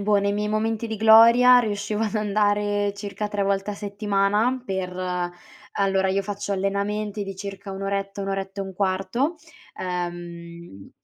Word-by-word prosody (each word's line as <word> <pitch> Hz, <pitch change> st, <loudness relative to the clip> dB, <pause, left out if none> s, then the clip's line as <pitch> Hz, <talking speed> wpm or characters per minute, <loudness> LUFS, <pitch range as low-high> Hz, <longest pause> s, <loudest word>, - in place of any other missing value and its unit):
boh, 205 Hz, +1 st, +2 dB
nei 200 Hz, 0 st, +1 dB
miei 210 Hz, +1 st, -1 dB
momenti 220 Hz, +1 st, -1 dB
di 220 Hz, -1 st, -4 dB
gloria 230 Hz, +3 st, +7 dB
riuscivo 210 Hz, -1 st, -1 dB
ad 220 Hz, -1 st, -2 dB
andare 205 Hz, -1 st, +1 dB
circa 205 Hz, +1 st, -5 dB
3 205 Hz, -1 st, -1 dB
volte 195 Hz, +1 st, 0 dB
a -, -, -6 dB
settimana 205 Hz, +4 st, 0 dB
per 185 Hz, -3 st, -3 dB, 0.8 s
allora 195 Hz, -1 st, +1 dB
io 195 Hz, +1 st, +1 dB
faccio 205 Hz, 0 st, -4 dB
allenamenti 200 Hz, +2 st, -2 dB
di 195 Hz, -1 st, -6 dB
circa 200 Hz, 0 st, -7 dB
1 195 Hz, 0 st, -6 dB
oretta, 195 Hz, 0 st, -3 dB
1 195 Hz, -, -4 dB
oretta 195 Hz, 0 st, -3 dB
e -, -, -5 dB
un 190 Hz, -1 st, -8 dB
quarto, 195 Hz, -, 0 dB, 0.4 s
uhm, 170 Hz, -, -6 dB
200 Hz, 160 wpm, -24 LUFS, 195-210 Hz, 0.8 s, gloria